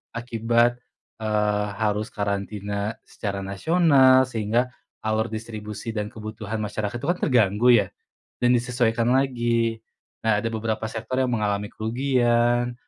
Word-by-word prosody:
Akibat, 120 +1 +1 0.4
eee, 105 -1 0
harus 105 0 -1
karantina 100 +1 -3
secara 100 -2 -5
nasional, 130 - +4
sehingga 120 +1 -1 0.3
alur 110 +1 0
distribusi 110 0 -6
dan 105 0 -2
kebutuhan 110 0 -6
masyarakat 105 +1 -3
tuh, 140 - -5
kan, 180 - -4
terganggu, 115 -3 +2
ya, 115 - +3 0.6
dan 120 - +4
disesuaikan 120 -1 +1
lagi. 120 -4 +1 0.5
Nah, 105 -2 +3
ada 115 - -1
beberapa 110 0 -2
sektor 115 +3 -5
yang 130 - 0
mengalami 105 -3 -1
kerugian. 120 0 +1
115 Hz, 120 wpm, -24 LUFS, 105-120 Hz, 0.6 s, nasional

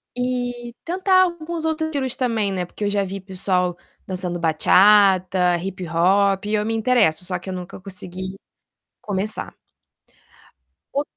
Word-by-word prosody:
E 245 -1 -3
tentar 370 +2 +3
alguns 340 -2 -3
outros 315 0 0
estilos 270 -5 -2
também, 225 -5 0
né. 185 -2 -2
Porque 195 - -8
eu - - +1
já 200 -1 +1
vi 195 +1 -5
pessoal 185 -2 -1 0.3
dançando 180 -2 -3
bachata, 185 +2 +4
hip 185 +1 -5
hop. 195 +4 +2
Eu 210 0 0
me 225 - -1
interesso, 220 -8 +2
só 180 -1 -2
que 190 - -9
eu - - -3
nunca 180 +1 -7
consegui 185 0 -7 0.7
começar. 205 +1 -3 1.4
O 285 - +2
195 Hz, 140 wpm, -22 LUFS, 185-245 Hz, 1.4 s, bachata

